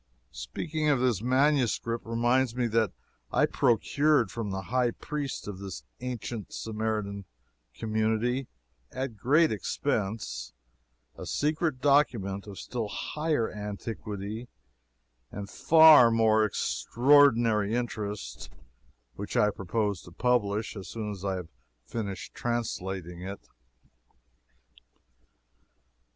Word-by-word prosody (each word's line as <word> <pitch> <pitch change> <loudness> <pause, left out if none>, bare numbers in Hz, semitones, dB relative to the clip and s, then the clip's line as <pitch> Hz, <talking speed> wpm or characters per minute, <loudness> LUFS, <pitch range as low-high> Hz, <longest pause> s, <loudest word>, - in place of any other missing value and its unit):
Speaking 155 - -3
of 140 -3 +3
this 120 -6 +1
MSS. 130 0 +3
reminds 120 +2 0
me 125 -1 0
that 115 -3 +1 0.4
I - - +4
procured 135 -1 +2
from 115 -3 -4
the 95 0 -3
high 125 +4 +1
priest 145 +1 -5
of 100 -2 -6
this 100 -2 -7 0.2
ancient 120 -4 -5
Samaritan 105 -2 -3 0.5
community, 110 +4 0 0.4
at 130 -3 -4
great 150 +10 +3
expense, 95 - -2 0.6
a - - -8
secret 150 -2 0
document 115 -9 +2
of 100 -2 -9
still 120 -4 -4
higher 150 +3 -1
antiquity 105 +1 -5 0.8
and 100 0 -6
far 155 0 +7
more 110 -1 +4
extraordinary 115 -2 +3
interest, 105 - -4 0.6
which 100 - -5
I 105 - +4
propose 100 0 -2
to 85 - -14
publish 110 0 0
as 95 -3 -7
soon 110 -2 -4
as 100 -2 -8
I 95 -1 -1
have 90 -3 -6 0.4
finished 100 - -5
translating 95 -7 -3
it. 95 +2 -7
110 Hz, 105 wpm, -28 LUFS, 100-125 Hz, 0.8 s, far